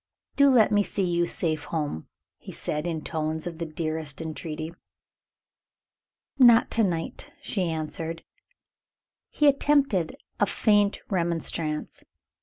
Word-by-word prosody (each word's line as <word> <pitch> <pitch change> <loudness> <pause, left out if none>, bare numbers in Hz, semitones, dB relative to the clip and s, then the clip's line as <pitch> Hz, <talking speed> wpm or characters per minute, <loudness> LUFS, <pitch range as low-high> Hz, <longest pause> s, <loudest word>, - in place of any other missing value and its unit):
"Do 280 0 +6
let 240 -5 +5
me 205 -1 +4
see 200 0 -1
you 175 -1 +1
safe 155 -4 -1
home!" 150 - -3 0.3
he - - -10
said, 150 +2 -3
in 160 -3 -3
tones 155 0 -3
of 170 -2 -6
the 165 - -3
tenderest 155 -2 -4
entreaty. 160 0 -5 1.7
"Not 240 -2 +7
to 225 - +4
night," 170 -4 -3
she 185 -5 -2
answered. 160 +1 -4 1.1
He 300 - +2
attempted 275 - +2 0.2
a 205 - +3
faint 205 0 +2
remonstrance. 170 -3 -2
170 Hz, 120 wpm, -26 LUFS, 155-205 Hz, 1.7 s, Not